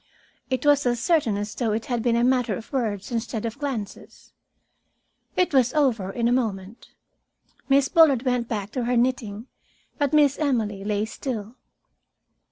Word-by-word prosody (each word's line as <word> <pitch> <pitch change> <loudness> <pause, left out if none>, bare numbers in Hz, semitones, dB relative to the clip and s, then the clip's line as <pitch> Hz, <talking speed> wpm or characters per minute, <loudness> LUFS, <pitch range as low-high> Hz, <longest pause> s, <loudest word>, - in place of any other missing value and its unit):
It 260 +1 -2
was 290 -2 +4
as 240 -1 0
certain 290 - +1
as 205 +1 -4
though 225 -4 -1
it 220 +1 -2
had 240 -2 -2
been 235 0 +1
a 235 - +2
matter 250 -1 +2
of 230 +3 -10
words 215 -5 -2
instead 230 -1 -3
of 230 +3 -5
glances. 260 -9 -6 1.0
It 365 -4 +1
was 260 +1 +3
over 240 -10 +1
in 235 +2 0
a - - +2
moment. 220 -3 -2 0.8
Miss 275 0 +4
Bullard 295 -8 +5
went 250 -3 0
back 210 -3 -4
to 245 -1 -2
her 245 0 +1
knitting, 235 -3 -1 0.5
but 285 -2 +1
Miss 290 -3 +3
Emily 225 -9 -1
lay 210 0 -1
still. 225 -2 -6
240 Hz, 165 wpm, -24 LUFS, 215-265 Hz, 1.0 s, Bullard